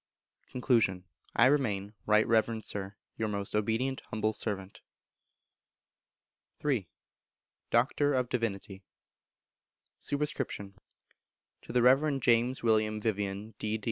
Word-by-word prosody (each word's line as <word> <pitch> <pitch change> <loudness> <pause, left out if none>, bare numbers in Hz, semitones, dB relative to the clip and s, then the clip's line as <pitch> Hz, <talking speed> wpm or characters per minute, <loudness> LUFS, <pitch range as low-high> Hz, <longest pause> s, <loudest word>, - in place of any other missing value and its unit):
Con. 115 -8 +2 0.3
I - - +6
remain, 105 -8 +1
Right 105 0 +5
Reverend 110 0 +2
Sir, 100 -1 -4 0.2
Your 110 - 0
most 100 -1 -3
obedient 115 +5 0
humble 110 -1 0
servant. 100 -3 -4 1.8
iii. 130 -10 0 0.8
Doctor 140 +4 +2
of 125 -1 +1
Divinity. 100 -5 -3 1.2
Sup. 145 - -3
To 125 -9 -7
the 125 -1 +3
Reverend 135 +1 +4
James 120 +2 +3
William 110 -1 +2
Vivian, 105 0 -2
D. 110 +1 -2
110 Hz, 100 wpm, -30 LUFS, 105-125 Hz, 1.8 s, I